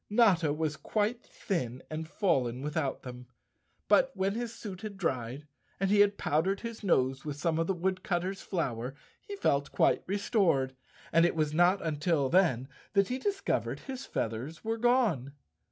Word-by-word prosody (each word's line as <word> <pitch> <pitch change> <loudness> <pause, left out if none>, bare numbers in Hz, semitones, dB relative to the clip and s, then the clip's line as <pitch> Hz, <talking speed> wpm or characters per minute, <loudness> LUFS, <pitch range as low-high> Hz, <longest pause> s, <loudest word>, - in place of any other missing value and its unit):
Notta 195 -8 +4
was 155 0 -1
quite 215 - -1
thin 130 - -4
and 155 +1 -5
fallen 135 - 0
without 150 -2 -2
them, 125 -1 -9 0.6
but - - +5
when 195 +1 0
his 235 +1 -3
suit 200 -5 -8
had 210 -3 -6
dried 135 -5 -2 0.3
and 195 0 +1
he 205 - +4
had 205 0 +5
powdered 180 +7 +1
his 230 -2 -6
nose 135 -7 +2
with 150 -2 -4
some 160 +2 0
of 165 - +1
the 195 - 0
wood¬ 185 +1 -1
cutter's 185 +1 -2
flour 130 - -3 0.3
he 410 - -7
felt 140 - +1
quite - - +3
restored, 185 - +1 0.4
and 165 +1 +6
it 175 - +2
was 155 -2 0
not 175 +4 +4
until 150 -2 +1
then 155 -9 +3 0.3
that 200 -1 +3
he 255 +1 -2
discovered 395 +6 -1
his 270 -1 -7
feathers 120 +8 -3
were 225 0 -1
gone. 220 - +2
170 Hz, 170 wpm, -30 LUFS, 140-205 Hz, 0.6 s, and